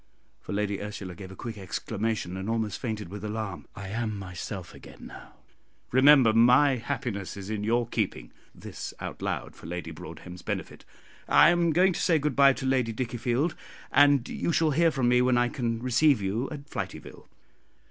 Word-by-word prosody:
for -, -, -9 dB
Lady 100 Hz, 0 st, -1 dB
Ursula 100 Hz, -3 st, -6 dB
gave 95 Hz, +1 st, -10 dB
a -, -, -10 dB
quick 110 Hz, -1 st, -7 dB
exclamation, 100 Hz, 0 st, -3 dB
and 95 Hz, +3 st, -4 dB
almost 110 Hz, -3 st, -1 dB
fainted 110 Hz, -7 st, -4 dB
with 105 Hz, +3 st, -8 dB
alarm; 105 Hz, -3 st, -5 dB
"I 100 Hz, -2 st, -7 dB
am 110 Hz, 0 st, -2 dB
myself 90 Hz, -4 st, -7 dB
again -, -, -13 dB
now. -, -, -12 dB, 0.6 s
Remember 130 Hz, -3 st, +6 dB
my 125 Hz, +4 st, +5 dB
happiness 115 Hz, -7 st, -4 dB
is 100 Hz, +1 st, -6 dB
in 105 Hz, -1 st, -3 dB
your 120 Hz, +2 st, +1 dB
keeping" 110 Hz, -4 st, -3 dB, 0.2 s
this -, -, -8 dB
out -, -, -7 dB
loud -, -, -3 dB
for -, -, -12 dB
Lady 85 Hz, -1 st, -5 dB
Broadhem's 85 Hz, +3 st, -10 dB
benefit. -, -, -5 dB, 0.4 s
"I -, -, +7 dB
am 175 Hz, -1 st, +2 dB
going 180 Hz, +4 st, +4 dB
to -, -, -3 dB
say 165 Hz, -3 st, +3 dB
good 150 Hz, -3 st, -1 dB
bye 140 Hz, -1 st, +6 dB
to 130 Hz, -, -6 dB
Lady 130 Hz, -3 st, +1 dB
Dickiefield, 120 Hz, +6 st, -1 dB, 0.4 s
and 145 Hz, -2 st, +5 dB
you -, -, -2 dB
shall 160 Hz, 0 st, +2 dB
hear 165 Hz, +4 st, +4 dB
from 135 Hz, -6 st, 0 dB
me 125 Hz, 0 st, +4 dB
when 125 Hz, 0 st, +3 dB
I 120 Hz, 0 st, +2 dB
can 115 Hz, -2 st, -2 dB
receive 130 Hz, +2 st, +3 dB
you 105 Hz, +7 st, -2 dB
at 145 Hz, -1 st, -8 dB
Flityville." -, -, -7 dB
115 Hz, 180 wpm, -27 LUFS, 100-135 Hz, 0.6 s, I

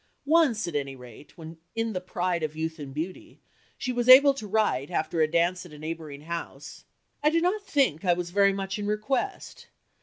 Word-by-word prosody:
Once 285 Hz, -, +3 dB
at 170 Hz, -, -5 dB
any 140 Hz, -2 st, -2 dB
rate, 125 Hz, +5 st, -14 dB
when 165 Hz, 0 st, -10 dB, 0.2 s
"in 225 Hz, -1 st, -1 dB
the 185 Hz, -, -3 dB
pride 180 Hz, -1 st, -2 dB
of 155 Hz, -1 st, -3 dB
youth 160 Hz, +1 st, -4 dB
and 140 Hz, -2 st, -7 dB
beauty," 160 Hz, +6 st, -6 dB, 0.4 s
she 255 Hz, -, -3 dB
was 245 Hz, 0 st, -1 dB
able 275 Hz, +2 st, +9 dB
to 250 Hz, -6 st, -7 dB
write, 200 Hz, -11 st, 0 dB
after 165 Hz, -1 st, -1 dB
a 155 Hz, -, +3 dB
dance 175 Hz, +3 st, +1 dB
at 175 Hz, -4 st, -13 dB
a -, -, -11 dB
neighbouring 155 Hz, -2 st, -7 dB
house 170 Hz, +2 st, -7 dB, 0.4 s
"I 300 Hz, -, +4 dB
do 330 Hz, +2 st, +2 dB
not 365 Hz, +5 st, 0 dB
think 270 Hz, -, +1 dB
I 180 Hz, -2 st, +4 dB
was 175 Hz, 0 st, -4 dB
very 200 Hz, +1 st, +4 dB
much 195 Hz, +1 st, -4 dB
in 205 Hz, -, -3 dB
request. 260 Hz, -, -3 dB
180 Hz, 205 wpm, -27 LUFS, 160-230 Hz, 0.4 s, able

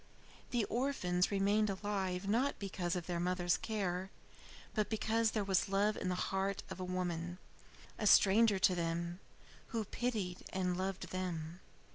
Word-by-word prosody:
The 235 Hz, -4 st, +1 dB
orphans 210 Hz, -9 st, +1 dB
remained 205 Hz, +2 st, +2 dB
alive 195 Hz, -1 st, -2 dB
not 245 Hz, +7 st, +2 dB
because 185 Hz, -3 st, -2 dB
of 175 Hz, -2 st, -3 dB
their 175 Hz, -1 st, -2 dB
mother's 175 Hz, 0 st, +1 dB
care, 190 Hz, -4 st, -2 dB, 0.6 s
but 215 Hz, -2 st, 0 dB
because 225 Hz, +1 st, +1 dB
there 215 Hz, -1 st, -1 dB
was 195 Hz, +2 st, +1 dB
love 205 Hz, +2 st, +2 dB
in 185 Hz, -, -2 dB
the 180 Hz, -, 0 dB
heart 195 Hz, +2 st, -1 dB
of 190 Hz, -, -6 dB
a -, -, -3 dB
woman, 180 Hz, -1 st, -2 dB, 0.6 s
a 210 Hz, -, +1 dB
stranger 205 Hz, +2 st, +6 dB
to 190 Hz, 0 st, +4 dB
them, 170 Hz, 0 st, -2 dB, 0.5 s
who 225 Hz, -3 st, -2 dB
pitied 210 Hz, -6 st, -2 dB
and 180 Hz, -1 st, 0 dB
loved 190 Hz, +1 st, -3 dB
them. 175 Hz, -2 st, -4 dB
190 Hz, 150 wpm, -35 LUFS, 180-210 Hz, 0.6 s, stranger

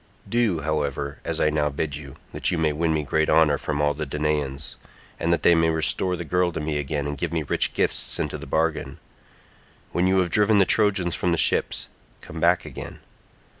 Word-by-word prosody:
Do, 115 Hz, -8 st, +1 dB
however, 70 Hz, -2 st, -2 dB
as -, -, -3 dB
I 75 Hz, -, +2 dB
now 75 Hz, -1 st, +1 dB
bid 70 Hz, +1 st, -3 dB
you, 70 Hz, -3 st, -9 dB, 0.2 s
that -, -, 0 dB
you 90 Hz, -, 0 dB
may 80 Hz, -2 st, +1 dB
win 80 Hz, +2 st, 0 dB
me 80 Hz, -1 st, 0 dB
great 80 Hz, +2 st, 0 dB
honour 80 Hz, -2 st, +4 dB
from 75 Hz, -1 st, -3 dB
all 75 Hz, 0 st, +2 dB
the 75 Hz, +1 st, -5 dB
Danaans, 75 Hz, -1 st, -2 dB, 0.4 s
and 85 Hz, -, 0 dB
that 85 Hz, -, +1 dB
they 85 Hz, -, +6 dB
may 80 Hz, -1 st, +3 dB
restore 80 Hz, +3 st, +2 dB
the 85 Hz, -, -6 dB
girl 90 Hz, +2 st, +1 dB
to -, -, -3 dB
me 75 Hz, -1 st, -2 dB
again 70 Hz, 0 st, -3 dB
and 75 Hz, 0 st, -3 dB
give 85 Hz, -, -2 dB
me 80 Hz, -2 st, -1 dB
rich -, -, 0 dB
gifts -, -, 0 dB
into -, -, -3 dB
the -, -, -9 dB
bargain. 80 Hz, 0 st, -1 dB, 0.9 s
When 90 Hz, +1 st, +1 dB
you 95 Hz, 0 st, +3 dB
have 90 Hz, -2 st, -2 dB
driven 105 Hz, +2 st, +3 dB
the 100 Hz, -, +5 dB
Trojans 95 Hz, -5 st, +2 dB
from 90 Hz, -, -1 dB
the 85 Hz, -, +1 dB
ships, -, -, +1 dB, 0.3 s
come 80 Hz, -, -9 dB
back 85 Hz, +2 st, +3 dB
again. -, -, -8 dB
80 Hz, 210 wpm, -24 LUFS, 75-85 Hz, 0.9 s, they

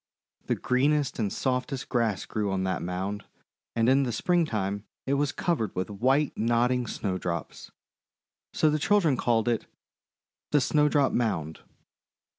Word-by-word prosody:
The -, -, +1 dB
greenest 140 Hz, +2 st, +1 dB
and 105 Hz, -3 st, 0 dB
softest 130 Hz, 0 st, -2 dB
grass 115 Hz, -5 st, 0 dB
grew 105 Hz, -2 st, -2 dB
on 95 Hz, -1 st, -1 dB
that 95 Hz, 0 st, -1 dB
mound, 95 Hz, +4 st, -3 dB, 0.5 s
and 115 Hz, 0 st, +2 dB
in 135 Hz, +2 st, +5 dB
the 130 Hz, -3 st, 0 dB
Springtime 110 Hz, -, 0 dB, 0.2 s
it 135 Hz, -, 0 dB
was 145 Hz, 0 st, +1 dB
covered 160 Hz, -, -1 dB
with 95 Hz, +3 st, -2 dB
white 135 Hz, +8 st, +1 dB
nodding 120 Hz, +2 st, +1 dB
Snowdrops. 95 Hz, -5 st, -4 dB, 0.8 s
So 155 Hz, -, +2 dB
the 155 Hz, -, 0 dB
children 170 Hz, -4 st, +3 dB
called 115 Hz, -2 st, +1 dB
it 115 Hz, -2 st, 0 dB, 0.8 s
'The 145 Hz, -, +3 dB
Snowdrop 150 Hz, -1 st, +3 dB
Mound." 80 Hz, -10 st, -1 dB
120 Hz, 135 wpm, -27 LUFS, 105-140 Hz, 0.8 s, in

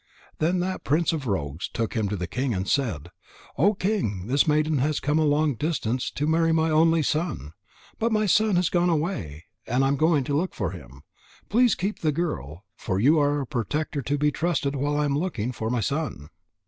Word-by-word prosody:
Then 175 Hz, +3 st, +1 dB
that 185 Hz, +1 st, -3 dB
prince 160 Hz, +4 st, +1 dB
of 145 Hz, -5 st, -3 dB
rogues 80 Hz, -5 st, -2 dB
took 115 Hz, -1 st, -3 dB
him 110 Hz, -3 st, -1 dB
to 105 Hz, -, -2 dB
the 90 Hz, -2 st, -3 dB
king 125 Hz, +6 st, -2 dB
and 95 Hz, +1 st, -3 dB
said: 90 Hz, -, -1 dB, 0.4 s
"O 200 Hz, +8 st, +3 dB
King, 185 Hz, -, -1 dB
this 140 Hz, +7 st, +2 dB
maiden 155 Hz, -1 st, +2 dB
has 150 Hz, +3 st, 0 dB
come 150 Hz, +2 st, +1 dB
a 155 Hz, -, +3 dB
long 150 Hz, 0 st, +2 dB
distance 130 Hz, -3 st, -2 dB
to 150 Hz, -, -3 dB
marry 165 Hz, +1 st, +2 dB
my 160 Hz, 0 st, +2 dB
only 160 Hz, +1 st, +4 dB
son. 150 Hz, -, -2 dB, 0.5 s
But 230 Hz, +1 st, +1 dB
my 215 Hz, -1 st, +2 dB
son 210 Hz, +1 st, +3 dB
has 175 Hz, -1 st, +2 dB
gone 175 Hz, 0 st, +2 dB
away, 150 Hz, -, -2 dB, 0.2 s
and 130 Hz, +3 st, +2 dB
I -, -, +3 dB
am 140 Hz, -, +1 dB
going 155 Hz, -1 st, +3 dB
to 140 Hz, +2 st, -2 dB
look 175 Hz, +5 st, -1 dB
for 95 Hz, -7 st, -2 dB
him. 70 Hz, -6 st, -12 dB, 0.5 s
Please 240 Hz, 0 st, +4 dB
keep 200 Hz, +4 st, -3 dB
the 155 Hz, -, +1 dB
girl. 105 Hz, -, -4 dB
For 95 Hz, 0 st, -2 dB
you 150 Hz, +8 st, +4 dB
are 145 Hz, 0 st, +2 dB
a -, -, -4 dB
protector 145 Hz, +4 st, -2 dB
to 145 Hz, +3 st, -1 dB
be 150 Hz, +1 st, +2 dB
trusted 145 Hz, -4 st, -1 dB
while 145 Hz, +2 st, -1 dB
I 150 Hz, -, +1 dB
am 140 Hz, -1 st, 0 dB
looking 125 Hz, -, -2 dB
for 110 Hz, -2 st, -4 dB
my 120 Hz, -1 st, 0 dB
son." 140 Hz, -, -3 dB
145 Hz, 210 wpm, -25 LUFS, 115-165 Hz, 0.5 s, only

